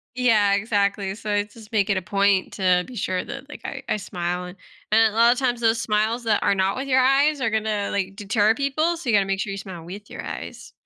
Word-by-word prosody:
Yeah, 220 -5 +3
exactly, 200 -2 0
so 210 -1 -5
I 205 0 +2
just 210 +1 -15
make 205 -2 +1
it 195 - +2
a - - -1
point 200 0 +1
to 180 -2 +2
be 255 - -11
sure 185 -3 -2
that, 275 +1 -8
like, - - -11
I 270 -1 -6
I - - 0
smile 180 -2 -4
and 180 +2 -10 0.3
and 220 -1 +4
a - - -9
lotta 235 +2 +5
times, 245 -3 0
those 225 0 +2
smiles 220 +3 0
that 220 -2 +1
are 200 - +3
not 190 +1 +1
with 270 +2 -4
your 260 0 +3
eyes 280 +3 +3
are 230 - +1
gonna, 215 -2 -1
like, 195 -1 -2
deter 210 +2 +2
people, 310 +5 0
so 300 - -9
you 215 - +4
gotta 200 - +3
make 195 0 -1
sure 195 - -2
you 195 - -4
smile 185 -4 -8
with 200 +5 -10
your - - -8
eyes. - - -8
210 Hz, 250 wpm, -23 LUFS, 195-235 Hz, 0.3 s, lotta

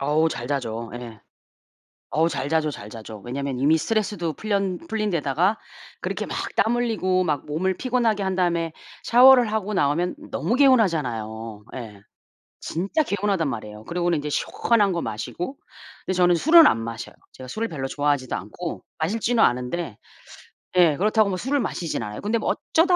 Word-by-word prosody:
어우 150 +3 +2
잘 120 -5 -5
자죠 115 -5 -3
예. 115 -3 -8 0.9
어우 160 +3 +2
잘 140 - -3
자죠, 160 -1 +1
잘 105 -7 -8
자죠. 110 -1 -9
왜냐하면 135 +2 -4
이미 150 +4 +4
스트레스도 200 -3 -1
풀련 195 -2 -1
풀린 215 -2 -1
데다가 170 +6 +1 0.4
그렇게 - - -3
막 - - -5 0.2
땀 230 +2 +3
흘리고 200 -6 +1
막 150 -6 -1
몸을 180 +6 0
피곤하게 235 -5 +1
한 190 -1 -1
다음에 170 -3 0 0.3
샤워를 245 -2 +7
하고 210 -1 -1
나오면 170 - +1
너무 235 - -1
개운하잖아요. 120 - +1
예. 110 -5 -8 0.6
진짜 195 - -1
개운하단 200 - 0
말이에요. 110 -4 -6
그러고는 175 -1 0
이제 150 +1 -4
시원한 205 +6 +1
거 170 -1 -1
마시고. 170 - -5 0.5
근데 185 - -1
저는 175 -1 +5
술은 320 - +7
안 - - +3
마셔요. 115 0 -6 0.2
제가 130 - -11
술을 220 - -3
별로 135 -4 -4
좋아하지도 145 -3 0
않고 110 - -6 0.2
마실 200 +8 -1
줄은 240 0 +1
아는데 125 - +1 0.8
예. 165 -5 +6
그렇다고 215 +2 +3
뭐 185 - -2
술을 275 +7 0
마시진 170 -8 -3
않아요. 105 0 -6
근데 220 +3 0
뭐 - - 0 0.2
어쩌다 355 +2 +4
170 Hz, 370 characters per minute, -24 LUFS, 135-210 Hz, 0.9 s, 샤워를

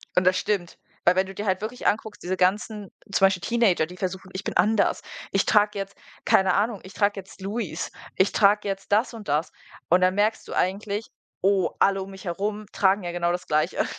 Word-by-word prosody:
und 180 - +4
das 185 0 +4
stimmt, 195 -5 -2 0.3
weil 175 - +5
wenn 190 0 +2
du 195 - -9
dir 205 - -4
halt 190 -2 +1
wirklich 225 +4 -6
anguckst, 215 0 -1
diese 185 +1 -2
ganzen 205 +2 0 0.2
zum 195 - +4
Beispiel 190 -2 +2
Teenager, 230 -8 +2
die 180 +3 -12
versuchen: 185 0 -4
„Ich 190 +1 -6
bin - - -3
anders, 205 +4 +3 0.3
ich 195 - +2
trage 210 -1 +3
jetzt”, 195 0 -5 0.3
keine 190 -1 +4
Ahnung, 210 +1 +1
„ich 190 - -12
trage 205 -1 +1
jetzt 190 0 -13
Louis, 195 -4 -4 0.2
ich 190 - +3
trage 205 0 +3
jetzt 195 +1 -3
das 225 +4 +2
und 220 -3 -9
das” 150 +3 0 0.4
und 180 - +5
dann 185 +1 +3
merkst 215 +2 +1
du - - -6
eigentlich: 200 +3 -1 0.3
„Oh, 195 -1 +2
alle 195 -1 +3
um 195 - -7
mich 190 -1 -11
herum 205 +3 -3
tragen 195 0 +2
ja 175 - -3
genau 175 0 0
das 180 - -5
Gleiche“, 155 +3 +1
195 Hz, 215 wpm, -25 LUFS, 185-210 Hz, 0.4 s, weil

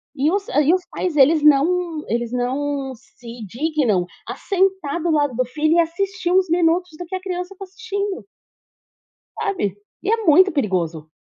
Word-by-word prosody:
E 290 +4 +1
os 395 +1 -1
e 295 +3 +3
os 365 -1 0
pais 360 -4 -2
eles 300 +3 +5
não 315 +2 +3
eles 235 0 -1
não 265 +2 -2
se 235 -1 -12
dignam 245 - 0 0.2
a - - -5
sentar 380 -5 0
do 340 +1 0
lado 290 -5 +1
do 255 +2 +1
filho 310 +5 0
e - - +4
assistir 365 +2 -1
uns 370 -1 +3
minutos 345 +1 +2
do 355 - -5
que 350 - -5
a 370 - -4
criança 360 0 -5
está 390 - -10
assistindo 405 0 -5 1.1
sabe. 355 - -1 0.3
E 385 - -2
é 455 - +3
muito 370 +5 +6
perigoso. 175 - -2
320 Hz, 170 wpm, -21 LUFS, 265-370 Hz, 1.1 s, muito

